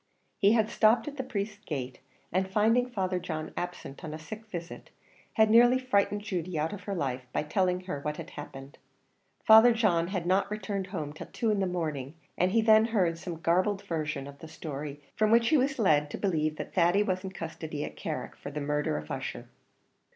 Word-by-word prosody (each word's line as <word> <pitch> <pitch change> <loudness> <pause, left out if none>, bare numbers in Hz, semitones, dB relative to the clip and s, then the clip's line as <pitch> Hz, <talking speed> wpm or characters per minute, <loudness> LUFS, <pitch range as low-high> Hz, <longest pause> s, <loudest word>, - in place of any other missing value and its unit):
He 200 +1 +5
had 220 -2 +3
stopped 220 +6 +4
at 290 -1 -6
the 265 - -2
priest's 210 -4 -4
gate, 130 -4 -5 0.3
and 190 +2 0
finding 225 +5 +3
Father 190 -5 -1
John 155 -3 -5
absent 175 -5 -6
on 155 -1 -5
a - - -5
sick 215 +8 -9
visit, 175 -4 -7 0.4
had 220 -1 +4
nearly 240 +2 +7
frightened 205 -5 +1
Judy 185 -5 -3
out 155 +4 -1
of 205 - -8
her 200 - -3
life, 130 -6 -3
by - - -1
telling 180 +3 0
her 180 -6 -5
what 150 +1 -3
had 165 +1 -8
happened. 135 +1 -10 0.6
Father 220 +2 +8
John 180 -7 +2
had 185 -2 -3
not 190 +3 +2
returned 200 -2 -3
home 155 -6 -5
till 155 - -9
two 225 -2 -1
in 210 - +1
the 190 - +1
morning, 155 -5 -3 0.2
and 180 +1 +2
he 225 +2 +3
then 220 0 +6
heard 185 -8 +1
some 170 -2 -6
garbled 185 +4 +1
version 155 -4 -3
of 140 0 -11
the 160 - -9
story, 150 -2 -6 0.2
from 215 0 +2
which 230 +1 +4
he 310 - +5
was 270 +1 +1
led 150 - +3
to - - -5
believe 155 -6 0
that - - -7
Thady 180 +3 +4
was 185 -2 -2
in 190 - -4
custody 160 -4 -5
at - - -8
Carrick, - - -5
for - - -8
the 150 +1 -5
murder 150 - -1
of 75 0 -7
Ussher. - - -5
185 Hz, 210 wpm, -29 LUFS, 155-215 Hz, 0.6 s, Father